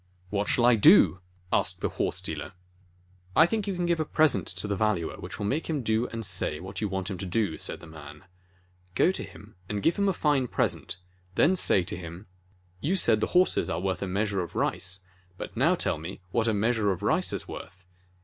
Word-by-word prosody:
"What 105 0 -1
shall 120 - +3
I 120 - +7
do 95 -5 +6 0.2
?" - - -34
asked - - +1
the - - 0
horse - - -2
dealer. - - -5 0.8
"I 160 - +7
think 215 +3 -2
you 195 - -1
can 175 0 -1
give 170 -1 +1
a - - +2
present 150 - +2
to 90 +3 -1
the 100 - -1
Valuer 100 -5 0
which - - -7
will 105 - -3
make 145 +11 -1
him 150 -5 -1
do 110 +2 +1
and 115 -1 -4
say 90 -5 +2
what 95 +2 -7
you 105 - -1
want 95 +1 -3
him 95 - -5
to 95 - -4
do 100 0 0
and 80 - -9
say," - - 0
said - - -11
the - - -11
man. 75 -1 -12 0.7
"Go 180 - +4
to - - -5
him 105 +2 -12 0.2
and 105 -1 -3
give 165 - +2
him 200 -1 +2
a - - +1
fine 145 -6 +1
present, 95 - -1 0.4
then 175 - +4
say 100 - +2
to 100 +4 -5
him: 85 +2 -9 0.5
'You 170 - 0
said 110 - +3
the - - 0
horses 185 - +3
are - - -1
worth 95 -1 -2
a 100 - -2
measure 100 +1 -1
of 85 - -7
rice, 90 +2 0 0.4
but - - -7
now 155 +10 +3
tell 80 - -2 0.3
what 115 -1 +1
a 110 - +2
meas 115 +4 +1
ure 105 -2 +2
of 95 +1 -4
rice 160 - +1
is - - -3
worth! 90 +2 -10
105 Hz, 235 wpm, -27 LUFS, 95-140 Hz, 0.8 s, I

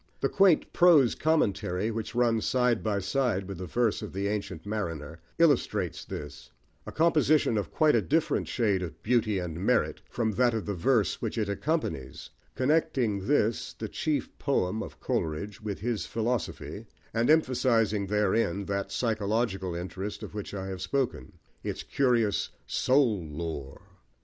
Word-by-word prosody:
The - - +1
quaint 195 -5 +3
prose 160 -9 +6
commentary, 105 - +1
which 115 +1 -5
runs 115 -2 +2
side 125 -3 +2
by 105 -2 0
side 110 -4 0
with 95 -3 -6
the 90 - -5
verse 115 +4 +1
of - - -7
The 100 +1 -1
Ancient 100 -5 -4
Mariner, 85 -7 -4 0.2
illustrates 165 -3 +2
this 75 0 -8 0.4
a - - -5
composition 155 -5 +3
of 105 - -1
quite 155 -1 +3
a 115 - +4
different 155 +8 0
shade 105 -6 +1
of 85 -3 -7
beauty 110 -3 +2
and 90 -1 -4
merit 125 +3 +1
from 115 -2 0
that 120 +3 +2
of 110 - -3
the 105 - -2
verse 105 +4 +1
which - - -3
it 110 -2 0
accompanies, 100 - -3 0.2
connecting 130 -8 +1
this, 115 -6 +1
the - - -5
chief 155 -2 -2
poem 110 -7 0
of - - -8
Coleridge, 80 +7 -3
with 105 -3 -5
his 115 -2 -2
philosophy, 115 0 -3 0.3
and 115 +3 +1
emphasising 120 -9 +3
therein 105 -1 +1
that 100 0 -2
psychological 105 -5 -1
interest 95 +3 -5
of - - -8
which 105 -1 -6
I 95 -1 -4
have 95 -1 -5
spoken, 105 - -2 0.3
its - - -4
curious 120 -6 +1 0.2
soul 125 -8 +2
lore. 75 -3 -6
110 Hz, 155 wpm, -28 LUFS, 95-125 Hz, 0.4 s, prose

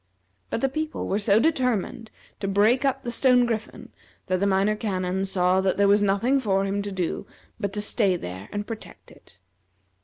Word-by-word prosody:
But - - -2
the 270 - +3
people 310 +3 -3
were 200 - 0
so 205 0 +3
determined 245 - 0 0.3
to 195 - -3
break 210 +7 +3
up 270 -1 0
the 240 - -3
stone 250 0 +4
griffin 225 -1 -4 0.4
that 185 0 0
the 200 - +1
Minor 200 +2 +2
Canon 190 -3 -2
saw 185 -1 +2
that 190 -1 0
there 200 0 +4
was 205 +1 +4
nothing 205 +7 +2
for 195 -5 +1
him 200 +1 -1
to 200 0 -5
do 185 -3 -3 0.3
but 200 - -2
to 210 - -2
stay 205 -3 +1
there 95 - -7
and 205 0 -3
protect 225 -1 -9
it. 90 - -19
205 Hz, 190 wpm, -25 LUFS, 190-235 Hz, 0.4 s, stone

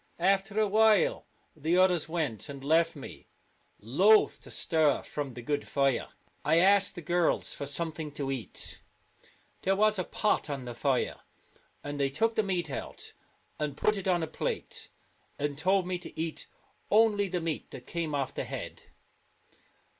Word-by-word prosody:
After 195 +3 +1
a 215 - +3
while 215 -1 +3 0.3
the 160 +3 +1
others 180 -4 +3
went, 150 - -2
and 140 -1 -8
left 165 +3 +3
me, 140 - -10 0.5
loath 190 - +4
to - - -13
stir 155 -4 +1
from 140 -4 -5
the 120 - -8
good 145 +3 -2
fire. 140 -3 +1 0.4
I 155 +2 +3
asked 195 +3 +4
the 175 - -7
girls 175 +1 +1
for 140 - -5
something 155 +1 -2
to 140 -2 -3
eat. 125 -8 -5 0.8
There 195 +1 +2
was 215 0 +3
a - - +1
pot 210 -3 0
on 135 -3 -4
the 120 - -5
fire, 130 +1 0 0.7
and 145 0 -5
they 140 -1 +2
took 225 +12 +1
the 220 - +2
meat 180 -6 -2
out - - -6 0.5
and 150 -2 -2
put 210 - +2
it 195 -1 -4
on 175 -3 +2
a - - -2
plate, 155 - -4 0.5
and 145 0 -2
told 185 +5 +2
me 180 -1 -2
to 175 - -10
eat 160 -1 -3 0.4
only 210 -2 +4
the 180 -1 -2
meat 165 -2 -3
that - - -10
came 165 -3 -3
off 135 -3 -2
the - - -3
head. - - -6
165 Hz, 170 wpm, -29 LUFS, 145-190 Hz, 0.8 s, loath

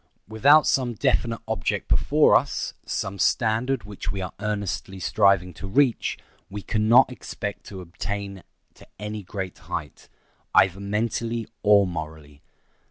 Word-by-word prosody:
Without 140 +8 +5
some 125 -3 +1
definite 115 -2 0
object 110 -7 -2
before - - +4
us, - - 0
some 95 0 -3
standard 115 +2 +1
which 105 0 -6
we 100 - -5
are 90 -2 -5
earnestly 100 -2 -3
striving 95 -2 +2
to 95 - -8
reach, 125 +4 +1 0.3
we 100 0 -7
can 110 -1 0
not 125 +2 +6
expect 105 -4 -6
to 95 -2 -8
attain 95 +3 -6 0.3
to - - -18
any 105 +1 -5
great 95 -1 -6
height, - - -6 0.5
either 95 0 +4
mentally 115 +3 -2
or 100 -1 +5
morally. 80 -4 -7
100 Hz, 135 wpm, -24 LUFS, 95-115 Hz, 0.5 s, not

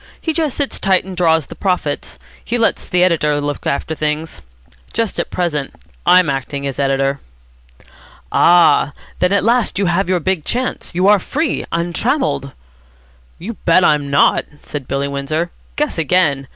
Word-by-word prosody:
He 320 - -2
just 310 -4 -1
sits 285 -2 -2
tight 190 -2 +2
and 190 -1 -7
draws 160 -4 +2
the - - -10
profits. 180 -7 -2 0.3
He 240 - -1
lets 230 -1 0
the 180 0 +3
editor 150 -5 +2
look 145 0 -3
after 150 +3 -1
things. 155 - -3 0.5
Just 230 -2 -1
at - - -2
present 150 -6 -2 0.3
I'm 180 0 +6
acting 140 +1 -3
as 135 -1 -4
editor." 135 0 +1 1.1
"Ah! 165 -4 +4 0.3
then 180 +1 +2
at 200 - +2
last 235 +2 +2
you 200 - +1
have 180 +2 +1
your 185 -1 +2
big 185 -1 -1
chance. 250 +8 -2
You 185 +2 +2
are 205 0 +6
free, 300 - -2
untrammelled." 170 - -1 0.9
"You 210 +7 -6
bet 180 +2 +4
I'm 145 -2 +2
not," 140 - +3 0.2
said 145 -4 -6
Billy 140 +1 -1
Windsor. 155 +5 -2 0.2
"Guess 300 - -1
again. 150 -4 +1
170 Hz, 160 wpm, -17 LUFS, 145-190 Hz, 1.1 s, I'm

